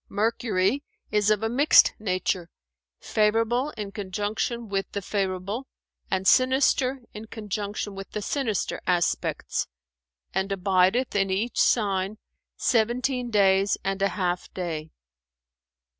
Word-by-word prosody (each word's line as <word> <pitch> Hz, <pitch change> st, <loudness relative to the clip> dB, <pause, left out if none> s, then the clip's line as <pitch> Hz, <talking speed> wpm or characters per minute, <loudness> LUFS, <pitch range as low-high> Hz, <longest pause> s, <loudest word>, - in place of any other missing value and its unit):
Mercury 220 Hz, +2 st, +1 dB, 0.3 s
is 210 Hz, -1 st, +2 dB
of 215 Hz, 0 st, +2 dB
a -, -, +2 dB
mixed 275 Hz, +7 st, +5 dB
nature, 185 Hz, -3 st, -1 dB, 0.5 s
favourable 225 Hz, +5 st, +1 dB
in 205 Hz, -2 st, -5 dB
conjunction 210 Hz, +4 st, -3 dB
with 195 Hz, -1 st, -2 dB
the 200 Hz, -, -2 dB
favourable, 195 Hz, +5 st, -2 dB, 0.4 s
and 190 Hz, 0 st, 0 dB
sinister 260 Hz, +1 st, +3 dB
in 215 Hz, +1 st, -8 dB
conjunction 210 Hz, -1 st, -4 dB
with 195 Hz, 0 st, -8 dB
the 210 Hz, -, -4 dB
sinister 235 Hz, -7 st, -1 dB
aspects, 175 Hz, -2 st, 0 dB, 0.7 s
and 190 Hz, +1 st, -1 dB
abideth 195 Hz, +6 st, +2 dB
in 195 Hz, -1 st, +2 dB
each 205 Hz, +6 st, 0 dB
sign 200 Hz, -2 st, +1 dB, 0.4 s
seventeen 245 Hz, +2 st, +1 dB
days 195 Hz, -2 st, +3 dB
and 195 Hz, 0 st, -2 dB
a 195 Hz, -, +4 dB
half 180 Hz, -3 st, -2 dB
day. 160 Hz, -4 st, -4 dB
205 Hz, 115 wpm, -26 LUFS, 190-230 Hz, 0.7 s, mixed